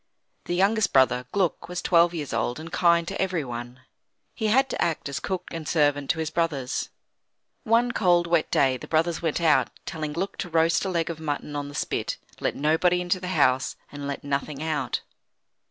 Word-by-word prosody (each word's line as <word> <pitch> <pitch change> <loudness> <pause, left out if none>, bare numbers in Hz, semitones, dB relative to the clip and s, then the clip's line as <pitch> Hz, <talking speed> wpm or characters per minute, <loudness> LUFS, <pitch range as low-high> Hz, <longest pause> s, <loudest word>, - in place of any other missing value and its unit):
The 175 - -2
youngest 200 +2 +2
brother, 125 -1 +3
Gluck, 180 -3 0
was 180 0 -3
twelve 170 -1 +4
years 150 -5 -4
old, 120 +4 -1
and 165 +1 -8
kind 170 -2 +3
to 195 - -3
everyone. 130 -9 -3 0.5
He 220 - -2
had 265 +5 +4
to - - -3
act 165 -3 0
as 140 +1 -3
cook 190 +1 -3
and 165 -2 -6
servant 145 -3 +2
to - - +2
his 160 -1 -2
brothers. 145 -6 -1 0.8
One 235 +2 +3
cold, 175 -6 +3
wet 170 -2 +1
day 130 -2 +3
the - - -10
brothers 165 +1 +1
went 165 -1 0
out, 165 -2 +3 0.2
telling 155 -2 -4
Gluck 185 +5 -3
to 180 - -4
roast 165 +3 +2
a - - -1
leg 170 -2 0
of 160 - -8
mutton 150 -1 -4
on 145 0 -3
the 145 - -10
spit, - - -2 0.2
let - - -1
nobody 160 +4 +2
into 180 +1 0
the 180 - -6
house, 130 +1 +3 0.2
and 145 -1 -6
let 140 - -4
nothing 140 +1 -3
out. 150 -6 -1
160 Hz, 195 wpm, -25 LUFS, 145-175 Hz, 0.8 s, twelve